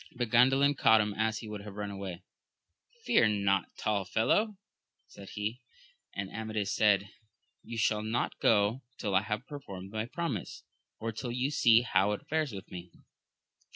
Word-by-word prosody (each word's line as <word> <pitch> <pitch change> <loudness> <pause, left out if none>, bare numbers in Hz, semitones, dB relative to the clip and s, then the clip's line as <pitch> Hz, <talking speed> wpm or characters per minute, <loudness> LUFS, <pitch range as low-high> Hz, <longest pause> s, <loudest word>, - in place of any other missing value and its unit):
But 120 -2 -2
Gan 125 +2 +7
dalin 140 +2 +3
caught 110 -4 +5
him 105 -1 0
as 110 +1 0
he 110 - -7
would 105 -1 -6
have 100 -1 -9
run 105 -1 -4
away; 95 -2 -6 0.8
Fear 210 - +5 0.2
not, 95 -2 +2
tall 105 -2 0
fellow! 200 - +1 0.5
said 100 -1 -12
he. 110 +5 -3 0.5
And 100 -1 -3
Amadis 110 -2 -3
said. 100 -1 +3 0.5
You 115 - -7
shall 105 0 +2
not 110 +2 -2
go 105 +3 +3 0.2
till 100 -3 -2
I 95 - +4
have 105 +3 -3
perfonned 100 -11 -8
my 110 +1 -3
promise, 140 - -4 0.4
or 115 +1 -3
till 120 +3 -5
you 125 +4 -1
see 120 -4 +5
how 100 -3 +2
it 105 - -6
fares 155 -3 0
with 95 -3 -9
me. 90 -1 -8
110 Hz, 170 wpm, -30 LUFS, 100-120 Hz, 0.8 s, Gan